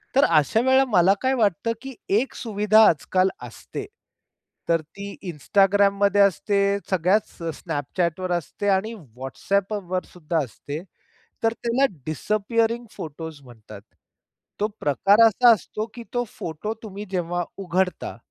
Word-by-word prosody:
तर 275 - +6
अशा 160 +7 +3
वेळेला 260 +1 +4
मला 195 -6 +4
काय 260 0 +2
वाटतं, 225 -3 +1
की 270 -2 -8 0.2
एक 265 - -3
सुविधा 215 -1 +3
आज-काल 185 +4 +1 0.2
असते. 410 - -8 0.8
तर 165 -1 +3
ती 180 +6 -11 0.2
Instagramमध्ये 200 +4 +3
असते, 200 +1 +2 0.3
सगळ्याच 190 +3 +2 0.2
Snapchatवर 170 +3 -2
असते 175 +4 -2
आणि 215 +4 -2 0.3
WhatsAppवर 185 +6 -2
सुद्धा 165 -1 -3
असते. 145 +4 -7 0.6
तर 225 0 +3
त्याला 240 +4 +1 0.2
डिसअपियरिंग 225 +7 0
फोटोज् 160 -1 -8
म्हणतात. 110 -5 -13 0.8
तो 210 - +2
प्रकार 195 - +3
असा 235 +2 +5
असतो, 215 +1 -4
की 240 - -8
तो 245 0 +1
फोटो 170 +7 -4
तुम्ही 205 -1 -7
जेव्हा 175 -1 -1
उघडता, 185 -1 -1
195 Hz, 120 wpm, -24 LUFS, 170-220 Hz, 0.8 s, तर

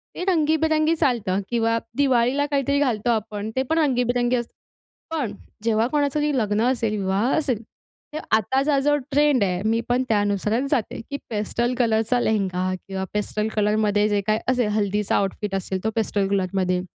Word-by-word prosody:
ते - - -4
रंगीबिरंगी 315 -2 +2
चालतं 230 - 0
किंवा 230 -1 +1 0.2
दिवाळीला 265 0 +2
काहीतरी 280 0 +1
घालतो 245 -5 0
आपण, 215 -2 -2
ते 260 - +1
पण 320 - +1
रंगीबिरंगी 245 -4 +1
असतं. 240 -1 -4 0.6
पण 255 -10 -2 0.3
जेव्हा 225 0 +2
कोणाचं 290 +1 0
तरी 295 0 +1
लग्न 210 -2 +1
असेल, 225 -4 -1
विवाह 200 +5 0
असेल, 260 -8 -1 0.5
तर 310 - -3 0.2
आताचा 270 +7 +1
जो 290 +2 +2 0.2
ट्रेंड 290 -5 +3
आहे, 180 -2 -1
मी 225 +1 +2
पण 250 +1 +2
त्यानुसारच 210 +4 +1
जाते, 250 -8 -1
की 280 - -3
पेस्टल 235 +3 -1
कलरचा 225 0 +2
लेहेंगा 185 -5 0
किंवा 190 -1 -4
पेस्टल 210 +1 -1
कलरमध्ये 210 0 +2
जे 205 -1 +1
काही 215 0 +2
असेल, 250 -3 +1
हल्दीचा 205 0 0
आउटफिट 195 0 -1
असेल, 190 0 -3
तो 220 - +1
पेस्टल 205 -3 0
कलरमध्ये. 185 -2 0
225 Hz, 160 wpm, -23 LUFS, 205-270 Hz, 0.6 s, ट्रेंड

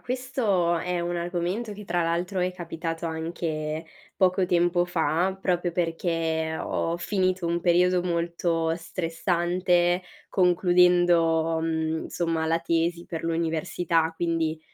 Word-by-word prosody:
questo 230 -9 0
è 180 +1 -2
un 175 0 -2
argomento 175 +6 -2
che 210 0 -9
tra 175 -2 0
l'altro 175 +3 -1
è 180 - +1
capitato 165 -2 -5
anche 160 -1 -3 0.3
poco 185 -1 +3
tempo 175 0 +2
fa, 175 +2 0
proprio 175 -2 0
perché 165 -2 -1
ho 165 +1 -1
finito 185 0 0
un 170 +1 0
periodo 180 +1 +3
molto 170 -1 0
stressante 175 +1 0 0.3
concludendo, 175 -3 +3
mhmm, 160 0 -1
insomma 165 -2 -1
la 165 +1 +2
tesi 170 +1 0
per 165 - -6
l'università, 165 0 0
quindi 165 -2 -1
170 Hz, 120 wpm, -26 LUFS, 165-180 Hz, 0.3 s, poco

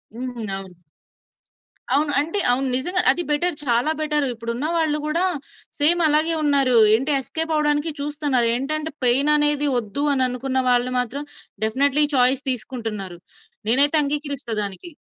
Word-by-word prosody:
హ్మ్. 250 +1 -6 0.2
అవును. 190 -2 -9 1.2
అవును. 290 +2 +1
అంటే 330 +8 -2
అవును. 265 +2 +1
నిజంగా 360 +8 +2
అది 350 +6 -2
బెటర్. 325 +3 +1
చాలా 245 +4 0
బెటర్. 300 -1 +1
ఇప్పుడు 230 0 -6
ఉన్న 275 +6 -2
వాళ్ళు 310 -2 0
కూడా 330 +4 0 0.6
సేమ్ 335 +4 +4
అలాగే 310 +2 +2
ఉన్నారు. 275 -4 +2 0.2
ఏంటి! 265 +7 0
ఎస్కేప్ 320 +4 -3
అవ్వడానికి 300 +1 0
చూస్తున్నారు. 285 -4 -1
ఏంటంటే 310 +5 -4
పెయిన్ 270 +5 +3
అనేది 295 0 +2
వద్దు 230 +4 -3
అని 260 -2 +2
అనుకున్న 260 +1 -2
వాళ్ళు 245 0 +1
మాత్రం 250 +4 -4 0.4
డెఫినైట్‌లీ 280 +6 +1
ఈ 295 - -6
చాయిస్ 255 +2 +2
తీసుకుంటున్నారు. 220 -7 -5 0.5
నేనైతే 285 +6 +6
అంగీకరిస్తా 285 -4 -4
దానికి. 200 - -5
280 Hz, 145 wpm, -21 LUFS, 245-300 Hz, 1.2 s, నేనైతే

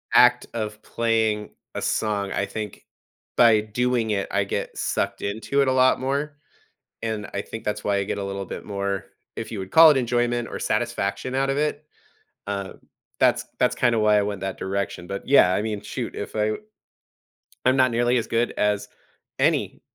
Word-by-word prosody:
act 125 0 +6
of 110 -1 -4
playing 110 -2 0 0.2
a - - -3
song, 100 -2 0
I 100 - 0
think 105 -2 -6 0.5
by 115 -3 +6
doing 120 +1 0
it, 100 -1 -1
I 100 0 +2
get - - -3
sucked - - -1
into 110 +7 0
it 135 - +2
a - - +3
lot 130 0 +4
more, 140 +3 -2 0.7
and 110 -2 -2
I 100 - 0
think 115 +2 -8
that's 105 0 -2
why 100 -1 +1
I 100 - +1
get - - -3
a 100 - -3
little 100 0 -4
bit - - -7
more, 100 -1 -3 0.3
if - - -6
you 110 - -4
would 95 0 -6
call 160 -1 +9
it, 145 - +2
enjoyment 120 -1 0
or - - -5
satisfaction 130 0 -1
out 135 0 +1
of 135 - -1
it, 150 0 -1 0.6
um, 100 -1 -4 0.4
that's - - +3
that's - - +3
kinda 120 -2 +2
why 105 -1 +4
I - - +3
went 100 -1 -3
that 95 -1 -3
direction, 95 -2 -3
but, 100 - -5
yeah, 130 -10 +6
I 105 - 0
mean, 110 -2 -3
shoot, - - -5
if - - -5
I 105 0 +1 1.1
I'm 130 +1 +4
not 130 -2 +4
nearly 120 +1 +2
as 115 - -1
good 115 +1 +1
as 105 -1 +1 0.5
any - - +1
110 Hz, 190 wpm, -24 LUFS, 100-125 Hz, 1.1 s, call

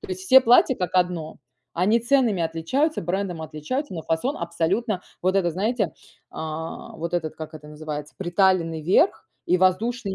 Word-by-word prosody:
То 410 - -10
есть 375 0 -4
все 265 -8 +7
платья- 250 +1 +5
как 180 -3 -4
одно. 180 -3 0 0.4
Они 205 +7 +2
ценными 235 -6 +2
отличаются, 165 - 0
брендом 180 0 -2
отличаются, 160 - -4
но 165 - -5
фасон 165 - -1
абсолютно 180 +5 -1 0.2
Вот 185 +2 +2
этот 175 -3 +1
знаете, 205 -1 -1 0.4
а, 160 +1 -6
вот 170 +2 -4
этот 160 -3 -2
как 155 0 -8
это 150 -1 -11
называется: 150 -1 -6
приталенный 175 -3 +1
верх 190 - +2 0.2
и 180 - +3
воздушный 195 +4 +1
180 Hz, 160 wpm, -24 LUFS, 160-230 Hz, 0.4 s, все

